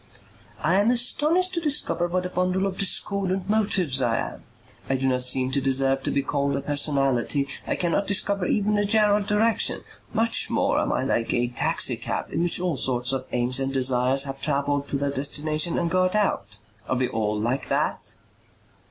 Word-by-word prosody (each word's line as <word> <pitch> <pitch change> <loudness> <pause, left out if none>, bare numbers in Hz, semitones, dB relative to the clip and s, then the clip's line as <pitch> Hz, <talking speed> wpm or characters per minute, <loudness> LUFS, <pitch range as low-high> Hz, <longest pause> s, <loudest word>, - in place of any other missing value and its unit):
"I 185 +6 +3
am 210 - +2
astonished 300 +9 +2
to 340 - -1
discover 285 - +1
what 180 +1 -2
a - - -3
bundle 185 +1 0
of 190 -1 -4
discordant 195 -1 -1
motives 195 -10 +2
I 115 -2 +1
am. - - -5 0.5
I 135 - +1
do 135 0 -1
not 125 -1 +1
seem 130 +1 +2
to 140 - +1
deserve 135 0 +2
to - - -3
be 140 - 0
called 140 0 -1
a 140 - -2
personality. 140 -1 0 0.2
I - - 0
cannot 180 +3 -1
discover 200 -1 0
even 210 0 +1
a - - +2
general 210 0 +3
direction. 210 +3 +1 0.3
Much 230 +1 +1
more - - +1
am - - -1
I - - 0
like 115 - 0
a 120 0 +1
taxi 120 - 0
cab - - -5
in - - 0
which 175 0 +1
all 175 -5 -1
sorts 125 0 0
of 130 -1 -3
aims 125 +2 0
and 135 0 -2
desires 130 0 +1
have 135 -1 -6
travelled 145 -1 -1
to 140 - +1
their 140 0 -1
destination 150 +4 0
and 170 -1 -1
got 185 +2 +1
out. 110 - -1 0.3
Are 130 - 0
we 130 0 +1
all 105 -2 -2
like 125 +5 -2
that?" - - -2
145 Hz, 190 wpm, -24 LUFS, 135-195 Hz, 0.5 s, I